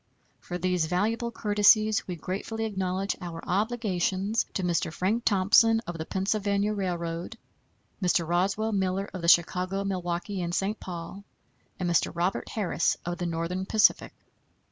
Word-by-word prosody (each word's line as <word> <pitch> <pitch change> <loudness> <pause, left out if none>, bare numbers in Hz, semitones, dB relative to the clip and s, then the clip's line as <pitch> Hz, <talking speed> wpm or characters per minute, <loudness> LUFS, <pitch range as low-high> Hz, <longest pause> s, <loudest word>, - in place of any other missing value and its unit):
For 175 - -5
these 180 -2 0
valuable 220 +7 0
courtesies 215 -1 +3
we 180 - -3
gratefully 205 +6 -4
acknowledge 190 -1 -2
our 170 -2 -6
obligations 205 0 0
to 190 - -1
Mr. 175 -2 0
Frank 200 +8 -1
Thomson, 215 +3 +5
of 175 -1 -6
the 160 - -5
Pennsylvania 200 +1 0
Railroad; 175 0 -3 0.6
Mr. 175 -2 +2
Roswell 195 +6 +1
Miller, 195 -1 0
of 185 - -5
the 170 - -2
Chicago, 180 +3 +3
Milwaukee 185 0 -3
and 175 0 -2
St. 205 +3 -1
Paul; 180 +2 -7 0.6
and 180 - -1
Mr. 170 -1 +2
Robert 175 +3 -1
Harris, 195 -6 0
of 175 +1 -3
the 175 - -1
Northern 170 +3 -3
Pacific. 220 -1 +3
190 Hz, 145 wpm, -27 LUFS, 175-205 Hz, 0.6 s, Thomson